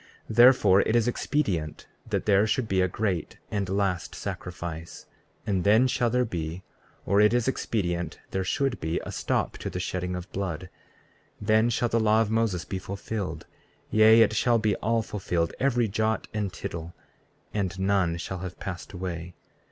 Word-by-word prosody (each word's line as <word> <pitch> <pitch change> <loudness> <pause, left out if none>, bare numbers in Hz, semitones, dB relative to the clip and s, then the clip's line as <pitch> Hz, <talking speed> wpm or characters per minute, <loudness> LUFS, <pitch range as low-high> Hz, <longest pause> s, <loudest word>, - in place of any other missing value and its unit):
34:13 - - -5
Therefore, 120 -6 +7
it 110 - 0
is 120 -1 +3
expedient 100 - -1 0.2
that - - -1
there 105 +1 +4
should 110 +2 0
be 95 -2 +2
a 95 - +3
great 90 -3 -2
and 100 -3 -1
last 95 -2 -1
sacrifice; 85 -2 -6 0.4
and 95 -4 0
then 110 +5 +5
shall 125 -2 +1
there 125 +2 +2
be, 85 -2 -4 0.4
or 100 +2 +4
it 105 +3 +5
is 120 -1 +1
expedient 90 -9 -1
there 95 0 -1
should 135 +6 0
be, 80 +1 -1
a - - -5
stop - - -1
to - - -4
the 90 - -4
shedding 90 0 -3
of 90 +1 -6
blood; 90 -2 -4 0.7
then 110 +2 +3
shall 120 +1 +1
the 115 - +2
law 110 0 +4
of 110 -1 +1
Moses 110 -6 0
be 95 - -4
fulfilled; 100 -3 -5 0.5
yea, 110 +1 +7
it 110 - +1
shall 120 +2 +3
be 110 -3 +1
all 115 +1 0
fulfilled, 90 -5 -2
every 125 -4 +2
jot 110 +1 -1
and 105 -3 -2
tittle, 85 0 -6 0.6
and 95 -2 -2
none 95 -3 +1
shall 95 +2 -5
have 90 0 -7
passed 90 -1 -6
away. 90 -2 -5
100 Hz, 175 wpm, -27 LUFS, 90-110 Hz, 0.7 s, Therefore